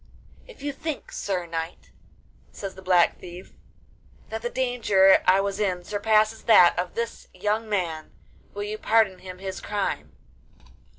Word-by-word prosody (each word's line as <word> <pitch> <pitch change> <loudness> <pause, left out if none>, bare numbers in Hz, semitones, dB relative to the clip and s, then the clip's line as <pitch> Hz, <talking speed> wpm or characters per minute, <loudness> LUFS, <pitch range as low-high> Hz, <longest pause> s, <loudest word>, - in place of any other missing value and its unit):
'If - - -14
you 285 0 -2
think, 310 0 -5
sir 185 -3 -3
knight,' 165 0 -6 0.6
says 195 -2 -7
the 190 - -12
Black 180 -2 +3
Thief, 180 +1 -11 0.8
'that 225 0 -5
the 240 - -2
danger 235 -7 +4
I 190 +1 +5
was 200 0 -3
in 185 -4 -1
surpasses 215 +3 +1
that 180 -6 +7
of 180 0 -3
this 230 0 -4
young 215 +1 -1
man, 170 -6 -2 0.4
will 205 - -3
you 210 +1 -5
pardon 220 -4 +2
him 185 -1 -9
his 190 0 -6
crime? 205 -1 -3
200 Hz, 145 wpm, -25 LUFS, 185-220 Hz, 0.8 s, that